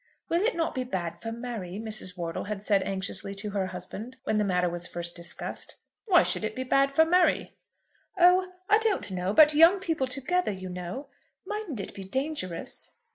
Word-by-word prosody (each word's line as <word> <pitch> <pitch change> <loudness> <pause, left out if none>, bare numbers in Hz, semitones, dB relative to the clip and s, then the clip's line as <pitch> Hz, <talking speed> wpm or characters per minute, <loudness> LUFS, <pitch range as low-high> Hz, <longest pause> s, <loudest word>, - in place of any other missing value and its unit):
"Will 340 +2 +2
it 460 +4 +1
not 330 -1 -1
be 255 - -2
bad 185 -9 -4
for 225 - -4
Mary?" 225 -6 -5
Mrs. 215 -4 -5
Wortle 165 -1 -3
had 205 -1 -5
said 200 -2 +3
anxiously 195 +1 -2
to 205 +1 -4
her 195 -2 -1
husband 190 +7 -7
when 215 - +1
the - - +3
matter 180 -2 +1
was 175 0 -1
first 170 0 -4
discussed. 170 -1 -2 0.3
"Why 360 -4 +6
should - - +1
it 215 0 -2
be 260 - -2
bad 275 +2 +3
for 320 +3 +5
Mary?" 360 +2 +2 0.6
"Oh, 365 +1 +5 0.2
I 425 +1 +5
don't 435 - +1
know; 185 +1 -1
but 300 +7 +7
young 330 +6 +7
people 325 -8 -1
together, 275 +5 +1
you 185 -1 -6
know? 180 +9 -6 0.4
Mightn't 415 - -4
it - - -7
be 195 - -7
dangerous?" 230 - -4
220 Hz, 190 wpm, -28 LUFS, -, 0.6 s, but